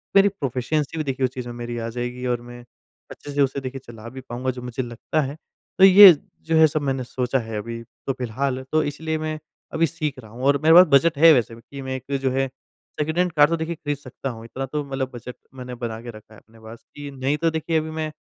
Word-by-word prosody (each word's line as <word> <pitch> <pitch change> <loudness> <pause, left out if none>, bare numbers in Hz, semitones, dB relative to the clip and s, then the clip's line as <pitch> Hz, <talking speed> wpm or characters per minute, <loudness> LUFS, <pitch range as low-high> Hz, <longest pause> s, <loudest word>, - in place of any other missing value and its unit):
मेरी 195 0 +7
प्रोफिशिएंसी 150 -2 -2
भी 155 - -1
देखिए 135 -2 -1
उस 125 - -2
चीज़ 125 -2 -6
में 120 - -6
मेरी 120 0 -5
आ 115 0 -3
जाएगी, 125 +1 -5
और 120 -1 -1
मैं 120 0 -11 0.5
अच्छे 145 - -9
से 145 - +1
उसे 140 0 +1
देखिए 135 0 -6
चला 115 -1 -11
भी 130 +2 -9
पाऊँगा 130 +1 -3
जो 125 0 -9
मुझे 125 +1 -4
लगता 120 +6 -2
है। 140 0 -4 0.4
तो - - +6
ये 195 0 +11 0.3
जो 165 - +1
है 160 0 +7
सब 155 0 -2
मैंने 135 -2 -1
सोचा 125 +1 -1
है 110 -2 -5
अभी 115 +2 -5 0.3
तो 135 - +1
फिलहाल, 130 +2 -3
तो 155 0 +3
इसलिए 160 +2 -3
मैं 155 0 -4 0.3
अभी 165 - +3
सीख 150 -4 -4
रहा 110 -4 -13
हूँ, 120 +3 -9
और 140 +1 +4
मेरे 160 +1 +6
पास 180 +1 +10
बजट 165 -1 0
है 165 +2 +8
वैसे 120 -4 0
कि 135 +3 -10
मैं 130 0 -4
एक 135 +2 -3
जो 135 -1 +1
है 135 +1 0 0.5
सेकंड 160 +2 -1
हैंड 180 0 +2
कार 150 -2 +5
तो 165 - 0
देखिए 165 +1 -3
खरीद 145 -2 -3
सकता 135 0 -7
हूँ, 115 -2 -8
इतना 135 +3 -5
तो 150 +3 -3
मतलब 135 -1 -3
बजट 120 +1 -8 0.2
मैंने 125 -1 -7
बना 115 -2 -5
के 120 - -9
रखा 110 0 -15
है 110 - -15
अपने 115 0 -22
पास, 110 +1 -12
कि 145 -1 -7
नहीं 135 +2 -1
तो 165 +1 +1
देखिए 160 +1 -1
अभी 155 0 -5
मैं 155 -1 -3
135 Hz, 255 wpm, -23 LUFS, 120-155 Hz, 0.5 s, ये